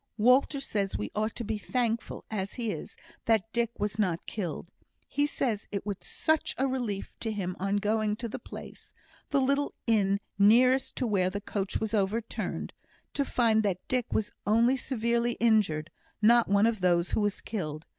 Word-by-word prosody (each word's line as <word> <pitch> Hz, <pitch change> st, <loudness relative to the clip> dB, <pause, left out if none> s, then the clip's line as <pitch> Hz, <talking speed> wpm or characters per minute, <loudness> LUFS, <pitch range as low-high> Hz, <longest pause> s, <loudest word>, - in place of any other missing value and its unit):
Walter 255 Hz, +5 st, +4 dB
says 205 Hz, -7 st, -1 dB
we 105 Hz, -, -4 dB
ought 215 Hz, +1 st, -1 dB
to 235 Hz, -, -3 dB
be 220 Hz, -1 st, -2 dB
thankful, 235 Hz, 0 st, -2 dB
as 195 Hz, -2 st, -3 dB
he 230 Hz, -4 st, -2 dB
is, -, -, -7 dB, 0.3 s
that 225 Hz, -1 st, +1 dB
Dick 235 Hz, -1 st, +1 dB
was 210 Hz, +1 st, -2 dB
not 180 Hz, -5 st, 0 dB
killed. 175 Hz, -3 st, -5 dB, 0.4 s
He 290 Hz, 0 st, +1 dB
says 235 Hz, -7 st, -1 dB
it 200 Hz, -2 st, -3 dB
was 200 Hz, -3 st, -2 dB
such 315 Hz, -1 st, 0 dB
a 265 Hz, -, +2 dB
relief 245 Hz, -7 st, -2 dB
to 225 Hz, -, -1 dB
him 185 Hz, -4 st, -3 dB
on 195 Hz, +2 st, 0 dB
going 210 Hz, +1 st, +1 dB
to 235 Hz, +2 st, -4 dB
the 225 Hz, -, -6 dB
place -, -, -11 dB, 0.3 s
the 285 Hz, -, +2 dB
little 280 Hz, +2 st, +1 dB
inn 200 Hz, -3 st, +2 dB, 0.2 s
nearest 255 Hz, +6 st, +5 dB
to 255 Hz, -, -1 dB
where 195 Hz, -5 st, +2 dB
the 200 Hz, +2 st, -4 dB
coach 200 Hz, -1 st, -3 dB
was 220 Hz, 0 st, -2 dB
overturned 215 Hz, +2 st, -1 dB, 0.4 s
to 285 Hz, -, +1 dB
find 230 Hz, -5 st, +3 dB
that 195 Hz, -4 st, -2 dB
Dick 250 Hz, -2 st, -1 dB
was 210 Hz, -, 0 dB, 0.2 s
only 230 Hz, +5 st, +4 dB
severely 235 Hz, -2 st, 0 dB
injured; 205 Hz, -10 st, +2 dB, 0.3 s
not 235 Hz, +2 st, +5 dB
one 200 Hz, +1 st, +4 dB
of 230 Hz, -2 st, +1 dB
those 175 Hz, -1 st, +2 dB
who -, -, +1 dB
was 205 Hz, -1 st, 0 dB
killed. 155 Hz, -8 st, -5 dB
220 Hz, 180 wpm, -29 LUFS, 200-235 Hz, 0.4 s, nearest